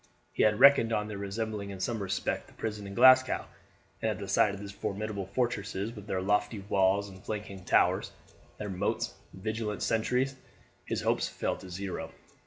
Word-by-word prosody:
He - - 0
had 105 -1 +4
reckoned 140 -5 +7
on 105 -1 0
their 105 -2 -6
resembling 100 0 -3
in 95 -1 -7
some 115 +2 -2
respect 95 -1 -2
the - - -18
prison 105 -2 -4
in 100 - -8
Glasgow, 130 +2 +6 0.6
and - - +1
at - - -2
the - - -6
sight 105 - +4
of 100 - -7
these 100 0 -7
formidable 100 0 -4
fortresses 110 -1 -2
with 105 -1 -10
their 95 -2 -1
lofty 105 +2 +1
walls 100 0 +2
and 95 -1 -13
flanking 105 -3 -5
towers, - - +3 0.5
their 105 - -5
moats 95 +2 -1 0.2
and 95 - -13
vigilant 110 -1 -2
sentries, 125 +4 +1 0.5
his - - -2
hopes - - +1
fell - - -2
to 95 - -11
zero. 95 +1 -5
105 Hz, 185 wpm, -30 LUFS, 100-110 Hz, 0.6 s, reckoned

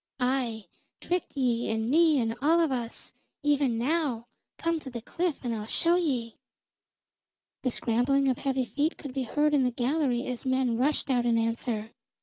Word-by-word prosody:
"Aye, 250 -4 0 0.3
tricked 355 -4 -3
ye 240 -3 +1
and 220 0 -1
me 320 -2 +5
and 225 -1 0
all 320 +4 +4
of 325 -4 +2
us! 240 -3 -4 0.3
Even 285 -5 +2
now 260 -2 0 0.3
come 335 -1 0
to 275 - -8
the 240 -2 -5
cliff, 340 -1 -2
and 235 - 0
I'll 215 -1 -4
show 340 +8 +2
ye." 260 -10 -1 1.2
The 255 - 0
scrambling 250 +4 +1
of 255 -2 +1
heavy 265 -2 0
feet 295 +6 -1
could 280 -4 -8
be 265 -1 -2
heard 300 +5 +1
in 285 - +4
the 250 - +3
gallery 250 0 0
as 250 -2 -4
men 260 -2 +1
rushed 275 +3 +1
out 245 -1 +2
in 230 -1 +3
answer. 230 -1 -1
260 Hz, 175 wpm, -28 LUFS, 235-295 Hz, 1.2 s, me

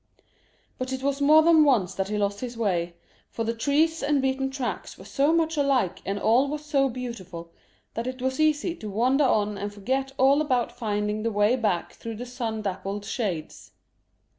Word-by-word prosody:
But 255 0 -3
it 260 0 -4
was 280 0 -1
more 305 +2 +6
than 320 -1 +6
once 220 - +2
that 195 0 -2
he 210 +1 -2
lost 200 0 -1
his 245 -2 -6
way, 175 -6 -1 0.3
for 230 - -4
the 230 +1 -1
trees 300 +7 +1
and 285 0 +2
beaten 265 0 0
tracks 265 -2 -5
were - - -13
so 285 +2 +1
much 325 -1 +1
alike 265 -10 +1
and 200 +1 -1
all 235 +7 +3
was 300 +1 -5
so 275 -3 +2
beautiful 190 -9 -7 0.4
that 230 +2 -4
it 255 0 -5
was 260 +2 -2
easy 310 +2 +2
to 215 - -7
wander 255 +8 +2
on 210 -4 +1
and 205 +1 -4
forget 260 +7 -2
all 275 +3 +4
about 255 -6 0
finding 210 -1 -2
the 230 +1 -1
way 205 +3 +3
back 210 -8 -1
through 230 -1 -7
the 240 +3 -6
sun 235 -3 -4
dappled 195 +1 -4
shades. 195 - -4
245 Hz, 190 wpm, -26 LUFS, 205-275 Hz, 0.4 s, more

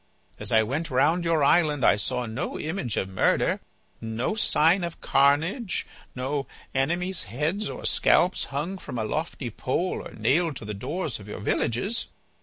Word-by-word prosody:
As - - -2
I 110 0 +5
went 150 +9 -2
round 150 +7 +3
your 165 -3 +2
island 150 -2 +3
I - - +6
saw 125 +4 -1
no 115 +4 -4
image 155 - -2
of 95 - 0
murder, 95 -1 +2 0.4
no 115 - -2
sign 175 -4 +3
of 170 -1 -4
carnage, 160 - +2 0.3
no 135 +2 -2 0.3
enemies' 170 +7 0
heads 155 - -1
or - - -7
scalps 180 +2 +3
hung 165 +8 -3
from 125 - -6
a 110 - -1
lofty 145 -1 -3
pole 165 - -1
or - - -10
nailed 140 +8 +1
to 115 - -7
the 105 - -4
doors 145 - -3
of 100 - -12
your 105 - -6
villages. 120 - 0
145 Hz, 165 wpm, -26 LUFS, 120-170 Hz, 0.4 s, I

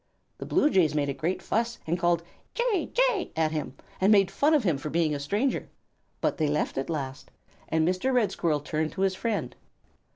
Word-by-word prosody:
The - - -6
Blue 295 - +3
Jays 165 -5 +3
made 145 -1 +1
a - - -1
great 170 +6 -2
fuss 235 +1 -1
and 170 +2 -1
called 170 -1 +2 0.3
"Jay! 475 -7 0
Jay!" - - +1
at 160 -1 +1
him, 150 -4 -4 0.3
and 195 +3 +5
made 195 -3 +5
fun 305 +2 +3
of 290 - +2
him 165 -8 +1
for 150 - -5
being 160 -1 +1
a 145 - -2
stranger, 205 - -1 0.5
but - - 0
they 155 -3 +1
left 150 +1 -1
at 135 - -4
last, 140 -4 -4 0.4
and 160 0 +2
Mr. 185 +9 +1
Red 245 -5 +2
Squirrel 155 -4 0
turned 155 +1 -2
to 190 - -4
his 195 -1 +2
friend. 215 +3 -2
175 Hz, 205 wpm, -27 LUFS, 155-230 Hz, 0.5 s, and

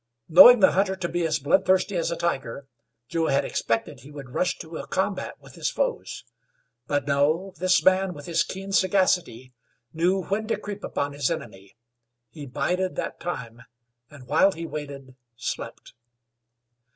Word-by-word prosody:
Knowing 205 +8 +9
the - - +6
hunter 190 0 +1
to 185 -2 -3
be 175 +1 -2
as 155 - 0
bloodthirsty 185 +7 +2
as 170 - 0
a 170 - -2
tiger, 140 -6 -3 0.4
Joe 165 -1 -1
had 135 - +1
expected 115 0 -2
he 135 - -14
would 140 -4 -10
rush 180 - 0
to 160 -2 -8
a - - -7
combat 190 0 -2
with - - -16
his - - -2
foes; - - -3 0.6
but, 145 -2 -1
no, 155 +7 +1
this 185 0 +2
man, 190 -1 +3
with 145 - -10
his 170 -1 +1
keen 195 +1 -7
sagacity, 180 - +1 0.4
knew 180 +4 +1
when 215 +4 -2
to - - 0
creep 205 0 -7
upon 145 0 -3
his 140 -2 -1
enemy; 105 - -7 0.6
he 150 -3 -9
bided 180 +8 -1
that - - -4
time, 120 -9 -6 0.5
and, 140 -4 -14
while 165 +9 +3
he 165 +1 -6
waited, 140 -4 -8 0.2
slept. 115 - -6
165 Hz, 165 wpm, -25 LUFS, 140-190 Hz, 0.6 s, Knowing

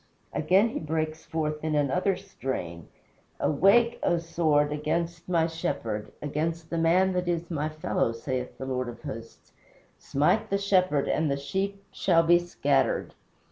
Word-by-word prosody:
Again 190 +8 +3
he - - -4
breaks 155 0 -3
forth 155 -1 -2
in 155 -1 0
another 165 +7 +2
strain: 110 - -5 0.5
"Awake, 200 +10 +4
O 175 - +2
sword, 155 -3 +1
against 165 +3 -2
my 165 -2 +3
Shepherd, 115 - -3
Against 160 +3 -2
the 170 - -1
man 180 +3 +3
that 180 -1 -1
is 170 0 -2
my 155 -1 -1
fellow, 155 -6 -1
saith 125 +2 -4
the 130 - -5
Lord 130 -1 -2
of 120 - -10
Hosts. 115 +1 -9 0.5
Smite 150 +10 +1
the 200 - +2
Shepherd, 185 -7 +2
And 155 -1 +1
the 140 - 0
sheep 195 +7 -3
shall 165 -3 +3
be 175 +1 +5
scattered." 145 -6 0
160 Hz, 150 wpm, -27 LUFS, 145-175 Hz, 0.5 s, be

